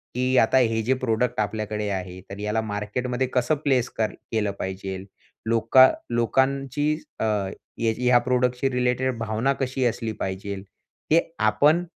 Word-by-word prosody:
की 130 +1 +1
आता 115 +3 +4
हे 115 -3 +2
जे 130 +4 +2
प्रॉडक्ट 120 -1 0
आपल्याकडे 105 0 -2
आहे, 95 -2 -4
तर 100 - -8
याला 105 +2 -1
मार्केटमध्ये 110 +5 -2
कसं 125 +4 +2
प्लेस 130 -3 +2
कर 110 -1 +1 0.2
केलं 105 -3 0
पाहिजेल, 95 0 -5 0.4
लोकां 115 +3 +6 0.3
लोकांची 135 +4 +1 0.3
अ, - - -1 0.6
ह्याची 115 +2 0
ह्या 125 0 +6
प्रॉडक्टशी 125 +1 +1
रिलेटेड 125 0 0
भावना 115 +5 0
कशी 130 0 0
असली 115 -1 -1
पाहिजेल. 95 +1 -4 0.5
ते 165 +2 +6 0.2
आपण 150 +11 +3
115 Hz, 140 wpm, -24 LUFS, 105-130 Hz, 0.6 s, लोकां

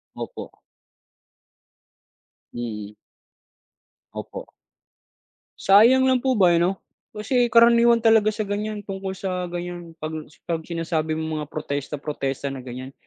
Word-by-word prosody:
Opo. - - -7 2.0
Mm. 105 -3 -6 1.2
Opo. - - -7 1.1
Sayang 235 +7 +6
lang 260 -1 +3
po 260 -3 +1
ba, 180 -3 +5
eh, 170 - +3
'no? 185 +3 +1 0.3
Kasi, 240 +3 0
karaniwan 235 0 +6
talaga 220 -1 +5
sa 215 0 -3
ganyan, 205 +1 -4
tungkol 190 -1 -5
sa 180 -2 -3
ganyan 175 -1 -7
'pag 155 -1 -6
s - - -22
'pag 165 -1 -2
sinasabi 160 -1 -2
mong 160 -1 -3
mga 150 - -7
protesta-protesta 145 -2 -4
na 135 - -7
ganyan, 130 +2 -8
175 Hz, 120 wpm, -23 LUFS, 155-215 Hz, 2.0 s, Sayang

